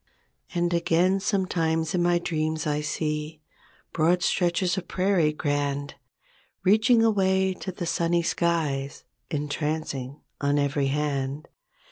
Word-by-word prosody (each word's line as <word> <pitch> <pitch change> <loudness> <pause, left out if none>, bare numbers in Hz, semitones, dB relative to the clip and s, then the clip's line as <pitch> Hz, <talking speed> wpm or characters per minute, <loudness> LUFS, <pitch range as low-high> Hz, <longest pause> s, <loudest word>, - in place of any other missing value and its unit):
And 175 0 +1
again 170 +3 +2
sometimes 165 -5 0
in 180 - +1
my 175 0 +3
dreams 155 -2 -2
I 150 0 0
see 150 +1 -3 0.5
Broad 170 +2 +2
stretches 175 0 +1
of 190 -2 -5
prairie 185 -5 +2
grand. 145 -2 -2 0.7
Reaching 220 +5 +4
away 190 -3 +2
to 190 - -4
the 180 -1 -5
sunny 170 +1 +1
skies; 155 -6 -1 0.3
Entrancing 150 -2 -3 0.2
on 145 0 +2
every 140 -1 +1
hand. 140 0 -2
160 Hz, 115 wpm, -26 LUFS, 150-180 Hz, 0.7 s, Reaching